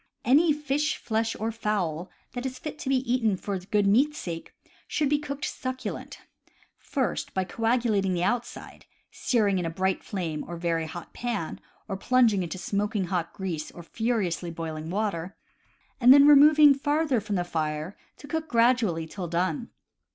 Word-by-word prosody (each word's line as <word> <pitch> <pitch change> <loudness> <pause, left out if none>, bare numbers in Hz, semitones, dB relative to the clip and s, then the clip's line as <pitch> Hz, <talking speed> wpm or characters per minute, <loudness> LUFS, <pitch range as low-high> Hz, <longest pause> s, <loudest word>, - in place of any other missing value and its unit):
Any 305 +6 +5
fish, 295 +1 -1
flesh, 225 0 -1
or 220 +2 -1
fowl 195 -7 -2 0.2
that 245 -1 -4
is 260 -1 -4
fit 300 +3 -7
to 270 - -4
be 270 - +3
eaten 245 -5 +1
for 195 0 -3
the 180 - -16
good 205 -1 +2
meat's 270 +10 +3
sake 165 -2 -6 0.4
should 295 -3 0
be 295 0 +2
cooked 285 -1 -5
succulent, 255 0 -5
by - - -29 0.3
first 265 -3 -2
coagulating 215 0 +1
the 175 - -1
outside 240 +5 -3 0.2
(searing 205 -6 +1
in 175 - -2
a - - -1
bright 190 +3 -1
flame 165 -6 -3
or 175 - -8
in - - -7
a - - -11
very 165 -1 0
hot 175 +1 -9
pan, 235 -9 -3 0.3
or 195 -3 -3
plunging 230 -2 +3
into 175 0 -4
smoking 205 +2 -1
hot 170 -2 -1
grease 175 -6 -4
or 175 - -11
furiously 195 -4 -1
boiling 160 -1 -5
water) 190 -2 -2 0.6
and 250 0 +7
then 280 +1 +9
removing 295 0 +8
farther 290 -2 0
from 205 0 -3
the 175 - +1
fire 155 +1 -3 0.2
to 285 - -12
cook 320 +2 -3
gradually 230 - +2
till 175 +2 -6
done. 185 - -1
215 Hz, 175 wpm, -27 LUFS, 175-255 Hz, 0.6 s, then